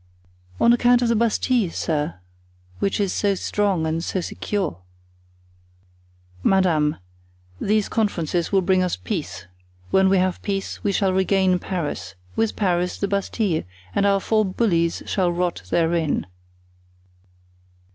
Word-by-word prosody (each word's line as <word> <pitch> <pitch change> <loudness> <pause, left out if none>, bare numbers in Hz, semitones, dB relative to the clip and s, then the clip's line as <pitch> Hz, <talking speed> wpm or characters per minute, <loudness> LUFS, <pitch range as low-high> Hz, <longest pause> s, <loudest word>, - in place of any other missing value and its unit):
"On 235 - +5
account 245 0 +4
of 235 - +1
the 230 - +3
Bastile, 230 -1 +1
sir, 155 -2 -2 0.6
which 195 - 0
is 200 -3 0
so 200 -1 +1
strong 195 -4 0
and 160 +1 -1
so 185 - -2
secure." 185 - -3 1.6
"Madame, 165 - +2 0.6
these 215 0 +1
conferences 175 -6 -1
will 195 -2 +3
bring 185 +1 +3
us 180 -1 0
peace; 90 0 -5 0.5
when 190 0 +4
we 195 - +4
have 185 0 0
peace 195 -1 -3
we 205 - +1
shall 195 -1 +1
regain 190 -1 +2
Paris; 170 - -4 0.2
with 225 -1 0
Paris, 180 -3 0
the 200 - -1
Bastile, 200 -3 0 0.3
and 200 - +2
our 200 0 +3
four 215 +2 +2
bullies 185 -4 0
shall 185 -3 +1
rot 175 - -1
therein." 165 - +1
190 Hz, 130 wpm, -23 LUFS, 170-205 Hz, 1.6 s, On